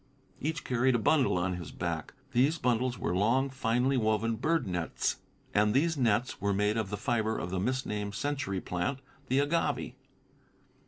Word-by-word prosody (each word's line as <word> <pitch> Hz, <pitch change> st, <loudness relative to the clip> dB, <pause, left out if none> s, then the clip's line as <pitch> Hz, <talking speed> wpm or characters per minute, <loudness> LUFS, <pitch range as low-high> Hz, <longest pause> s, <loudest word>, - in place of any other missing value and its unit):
Each 160 Hz, +2 st, -2 dB
carried 125 Hz, +1 st, +2 dB
a -, -, +4 dB
bundle 130 Hz, -2 st, +3 dB
on 90 Hz, 0 st, 0 dB
his 85 Hz, -4 st, -7 dB
back. 85 Hz, -, -4 dB, 0.2 s
These 135 Hz, +6 st, +3 dB
bundles 125 Hz, -2 st, +1 dB
were 90 Hz, -, -1 dB
long, 125 Hz, +8 st, +2 dB
finely 130 Hz, +1 st, +1 dB
woven 110 Hz, 0 st, +1 dB
bird 160 Hz, +8 st, +1 dB
nets, 90 Hz, -3 st, -1 dB, 0.4 s
and 105 Hz, +1 st, +3 dB
these 160 Hz, +4 st, +3 dB
nets 120 Hz, -4 st, +1 dB
were 100 Hz, 0 st, +1 dB
made 105 Hz, +1 st, +2 dB
of 110 Hz, -4 st, -1 dB
the 105 Hz, -, -3 dB
fiber 110 Hz, 0 st, 0 dB
of 90 Hz, -, -4 dB
the 95 Hz, -, -1 dB
misnamed 105 Hz, -3 st, -2 dB
century 140 Hz, -7 st, -2 dB
plant, 90 Hz, +9 st, -2 dB, 0.3 s
the 130 Hz, -, +1 dB
agave. 145 Hz, +4 st, 0 dB
115 Hz, 165 wpm, -30 LUFS, 100-130 Hz, 0.4 s, a